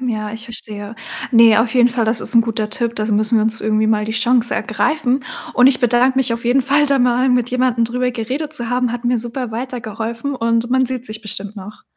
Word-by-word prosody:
ja, 215 -4 -3
ich 225 0 -7
verstehe. 215 -2 -4 0.3
Ne, 230 -3 +6
auf 225 +1 0
jeden 245 -1 +5
Fall, 240 -1 -1
das 220 +1 -1
ist 230 - -4
'n 230 - +7
guter 225 -2 -2
Tipp, 235 +1 -2
das 215 0 -1
müssen 215 +2 +3
wir 215 - +2
uns 220 0 -2
irgendwie 215 0 +1
mal 215 -1 +1
die 220 - -5
Chance 240 +1 +2
ergreifen. 280 -4 -1 0.3
Und 250 +1 +5
ich 270 - +3
bedanke 245 +1 +2
mich 260 -2 +2
auf 230 +1 -5
jeden 245 +3 +3
Fall 285 +3 +2
da 280 -1 +2
mal, 250 +1 +2
mit 245 -1 +1
jemandem 250 -2 +1
drüber 250 +2 -1
geredet 260 +6 -4
zu 240 -6 -4
haben, 250 0 0
hat 240 +1 -5
mir 245 +1 +2
super 240 +1 -5
weitergeholfen 235 +1 -5
und 230 -1 0
man 260 0 +2
sieht 255 -1 -3
sich 215 +1 -7
bestimmt 205 -1 -3
noch. 205 +1 -11
235 Hz, 230 wpm, -18 LUFS, 220-250 Hz, 0.3 s, n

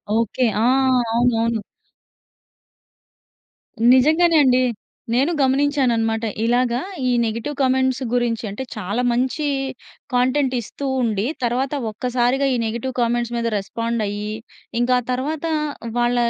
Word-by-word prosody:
Okay. 230 +3 +1 0.2
ఆ! - - +3 0.5
అవునవును. 230 -2 +1 2.3
నిజంగానే 315 +5 +4
అండి. 255 0 +4 0.5
నేను 275 +8 +2
గమనించాను 275 -1 +2
అన్నమాట. 225 0 0 0.2
ఇలాగ 240 +1 +2 0.4
ఈ - - +2
నెగెటివ్ 230 +6 -3
కామెంట్స్ 260 0 +2
గురించి 235 -2 0
అంటే 205 +7 -5
చాలా 215 +4 -2
మంచి 260 +5 0 0.7
కంటెంట్ 260 +2 +2
ఇస్తూ 275 +5 -7 0.2
ఉండి 215 -2 0 0.2
తర్వాత 255 +4 0 0.2
ఒక్కసారిగా 250 +4 0
ఈ - - +1
నెగెటివ్ 235 +3 -3
కామెంట్స్ 240 0 0
మీద 230 -1 -1
రెస్పాండ్ 230 +3 -3
అయ్యి, 210 +1 -4 0.5
ఇంకా 250 +1 +3
ఆ - - -13
తరువాత 290 +5 -3 0.5
వాళ్ళ 240 0 +2
245 Hz, 115 wpm, -21 LUFS, 230-260 Hz, 2.3 s, నిజంగానే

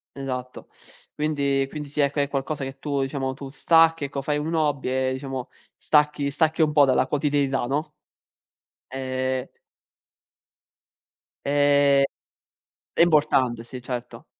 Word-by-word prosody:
Esatto. 130 -2 -6 0.5
Quindi 140 -3 0
quindi 150 -1 -6
sì, 145 - -6
ecco, 140 +1 +1
è 140 - +2
qualcosa 140 +1 -3
che 135 0 -6
tu, 140 -2 -2
diciamo, 135 -1 -2
tu 135 0 -9
stacchi 165 +3 +3
ecco, 140 0 -3
fai 145 +2 -1
un 155 +3 -3
hobby 145 -5 0 0.2
e 130 - 0
diciamo 130 -1 -5 0.3
stacchi 150 -1 +2
stacchi 160 +2 +1
un 155 - +3
po' 145 -1 +6
dalla 130 -1 +2
quotidianità, 140 -2 0
no? 150 +4 -2 1.0
Ehm 130 0 -2 2.0
Ehm, 145 -1 +4 0.9
è - - -3
importante 130 -8 +2
sì, 125 +1 -9
certo. 120 -2 -6
140 Hz, 130 wpm, -24 LUFS, 130-150 Hz, 2.0 s, po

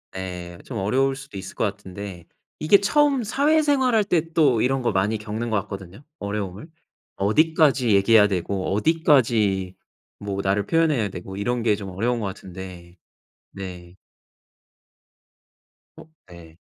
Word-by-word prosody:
예 90 -2 -6
좀 120 - -6
어려울 135 +7 +1
수도 135 -7 -10
있을 95 0 -8
것 - - -1
같은데 100 -3 -7 0.3
이게 195 +7 +5
처음 280 +3 +2
사회생활할 280 -2 +2
때 165 -4 -1
또 140 -9 +3
이런 135 +1 +1
거 120 - +1
많이 105 +3 +1
겪는 110 +2 -4
것 110 - +2
같거든요 100 +4 -9 0.2
어려움을? 100 - -5 0.5
어디까지 140 +3 +3
얘기해야 105 +1 +5
되고 95 0 -2
어디까지 110 - +2 0.4
뭐 100 -1 -3
나를 100 +1 +1
표현해야 155 -9 +2
되고 95 +2 -8
이런 120 +4 -1
게 110 -2 +3
좀 100 -2 -7
어려운 115 +6 -1
것 110 - -3
같은데 90 -2 -9 0.6
네. 90 -2 -9 2.1
어 - - -15 0.2
예. 85 -1 -14
105 Hz, 275 characters per minute, -23 LUFS, 95-140 Hz, 2.1 s, 이게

